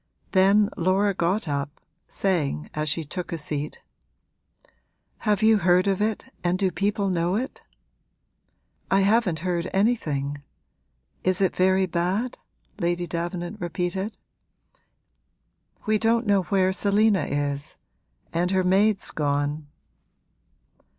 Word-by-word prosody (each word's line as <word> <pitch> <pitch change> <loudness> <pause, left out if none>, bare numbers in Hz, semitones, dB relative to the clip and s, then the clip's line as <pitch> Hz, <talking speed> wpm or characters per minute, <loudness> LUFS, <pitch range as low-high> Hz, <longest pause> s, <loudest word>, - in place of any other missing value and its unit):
Then 200 +2 +4
Laura 190 +3 +2
got 180 +2 0
up, 140 0 -3 0.3
saying 150 - -1
as 155 0 -1
she 160 +3 -1
took 175 +4 -6
a 170 - -2
seat, 150 -1 -4 1.4
'Have 210 0 +1
you 220 -1 +5
heard 180 0 +4
of 195 0 0
it 215 0 -1 0.2
and 175 +1 +1
do 190 -1 +1
people 200 +2 0
know 175 +1 0
it?' 255 +5 -4 1.3
'I 195 +1 +4
haven't 200 -4 +2
heard 175 0 -1
anything. 150 - 0 0.8
Is 185 0 +2
it 190 -2 +1
very 190 +1 +3
bad?' 185 +7 -1 0.4
Lady 175 -1 0
Davenant 175 +4 -4
repeated. 180 +4 -3 1.7
'We 215 0 +2
don't 230 +2 +2
know 200 -2 +3
where 190 -1 +2
Selina 205 -3 +2
is 145 0 -2 0.6
and 175 +2 +1
her 190 0 +2
maid's 195 +3 +3
gone.' 145 0 -1
185 Hz, 115 wpm, -25 LUFS, 170-200 Hz, 1.7 s, you